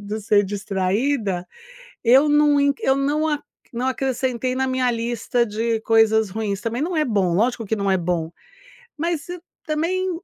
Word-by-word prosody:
do 205 +2 -4
ser 205 -1 +3
distraída, 195 +1 -1 0.6
eu 260 +5 +5
não 295 -1 +4
in 280 0 +3
eu 265 - +2
não 290 +3 0
a 295 -2 0 0.3
não 245 +1 -3
acrescentei 255 -1 -1
na 265 0 0
minha 255 -1 +1
lista 235 +1 -1
de 225 +1 -1
coisas 220 -2 +3
ruins, 210 -1 -3
também 235 +3 -3
não 335 +1 -1
é 305 - +2
bom, 195 -7 +1
lógico 230 +2 0
que 220 - -1
não 200 -1 0
é 190 - +3
bom, 170 -2 -2 0.7
mas 330 -1 -2 0.4
também 345 +5 -1
235 Hz, 165 wpm, -22 LUFS, 205-280 Hz, 0.7 s, eu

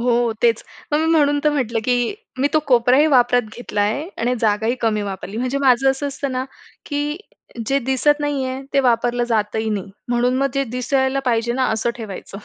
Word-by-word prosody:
हो 240 0 +1 0.3
तेच 230 -1 +3 0.3
मग 295 - +3
मी 320 - +1
म्हणून 290 -2 +3
तर 300 - +4
म्हटलं 250 -6 -1
की 245 - +1 0.2
मी 275 +2 +2
तो - - +6
कोपराही 250 +4 +5
वापरात 245 0 +4
घेतला 225 -4 -3
आहे 225 +11 -1
आणि 240 +2 +1
जागाही 220 +2 +1
कमी 215 -2 +1
वापरली. 195 +1 -6
म्हणजे 255 +3 -1
माझं 270 -1 +4
असं 270 +2 -3
असतं 280 -1 -4
ना, 255 0 -2 0.4
की 295 +2 -2 0.5
जे 275 +3 +2
दिसत 265 +4 +1
नाही 290 -2 -1
आहे 260 +1 -4
ते 275 - +5
वापरलं 245 -1 +1
जातही 220 0 0
नाही 200 -2 -3 0.2
म्हणून 245 +1 +1
मग 275 0 +2
जे 275 0 +1
दिसायला 265 +1 +1
पाहिजे 235 -1 +1
ना 260 +1 0
असं 220 +2 0
ठेवायचं. 200 -3 -8
250 Hz, 195 wpm, -20 LUFS, 230-275 Hz, 0.5 s, तो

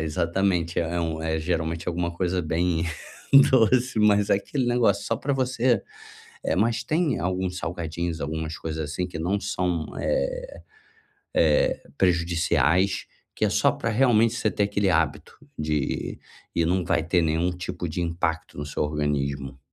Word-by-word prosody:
é - - -1
exatamente, 85 +2 0
é 85 +1 -1
um 80 -1 -2
é 80 0 -1
geralmente 85 +1 -2
alguma 85 0 -1
coisa 90 +1 -1
bem 85 +1 0 0.7
doce, 125 -1 +3
mas 105 -1 +4
é - - +5
aquele 125 +6 -2
negócio 115 -5 +2
só 115 - 0
pra 140 +4 -2
você 125 -4 +1 0.6
eh, - - 0
mas 115 +4 +1
tem 155 +1 0
alguns 90 0 -2
salgadinhos, 85 -1 -3
algumas 80 +2 -4
coisas, 80 -1 -4
assim, 90 +3 -2
que 80 - -7
não 95 +5 0
são, 90 -5 -1
eh - - -2 0.7
eh, - - +3 0.2
prejudiciais, 85 +1 +2 0.3
que - - -2
é - - +4
só - - +3
pra 115 - -3
realmente 115 -1 +3
você 110 - 0
ter 105 - 0
aquele 100 -1 +1
hábito 80 -1 0 0.2
de 75 -2 -2 0.4
e 85 - +2
não 90 +1 +1
vai 80 - +2
ter 85 +1 +2
nenhum 80 +3 +1
tipo 90 -1 -5
de 85 +3 -3
impacto 85 -1 -2
no 75 - -4
seu 75 - -2
organismo. 70 -2 -2
90 Hz, 160 wpm, -25 LUFS, 80-105 Hz, 0.7 s, é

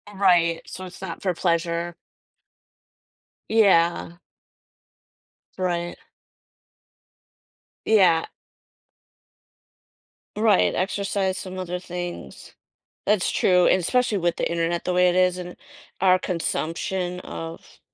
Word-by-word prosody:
Right, 175 -4 +3
so 185 - -8
it's 180 +1 -12
not 180 -3 -6
for 185 -2 0
pleasure. 170 0 -1 1.5
Yeah. 175 -5 +3 1.4
Right. 175 -2 -2 1.9
Yeah. 180 -7 +4 2.1
Right, 215 -3 +3
exercise 195 0 -1
some 185 0 -7
other 180 -1 -4
things. 175 - -7 0.5
That's 205 -3 +2
true, 180 -1 +3
and 185 - +4
especially 235 +1 +1
with 175 -1 0
the - - 0
Internet 170 0 -1
the 180 - 0
way 180 0 +4
it 175 - 0
is 185 0 +3
and 180 0 -7 0.5
our 185 -1 +5
consumption 180 +1 -2
of 165 0 -9
180 Hz, 95 wpm, -24 LUFS, 170-185 Hz, 2.1 s, our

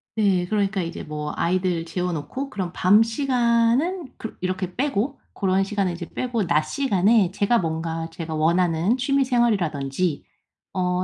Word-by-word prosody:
네. 190 -5 +2
그러니까 200 -2 0
이제 170 0 -5
뭐 150 -1 -4
아이들 180 -1 0
재워 180 +1 -2
놓고 170 - -4
그럼 185 -7 -4
밤 205 +5 +5
시간은 250 +6 +1
그렇 225 - -7
이렇게 185 0 -3
빼고 270 0 -1
고런 195 0 +1
시간은 195 -3 -1
이제 170 0 -6
빼고 235 -7 -2
낮 155 -2 +3
시간에 205 - +2
제가 205 +4 +2
뭔가 165 0 -3
제가 165 -2 -6
원하는 170 +6 +2
취미 275 +1 +2
생활이라든지 180 - 0 0.5
어 180 -1 0
185 Hz, 320 characters per minute, -23 LUFS, 170-230 Hz, 0.5 s, 밤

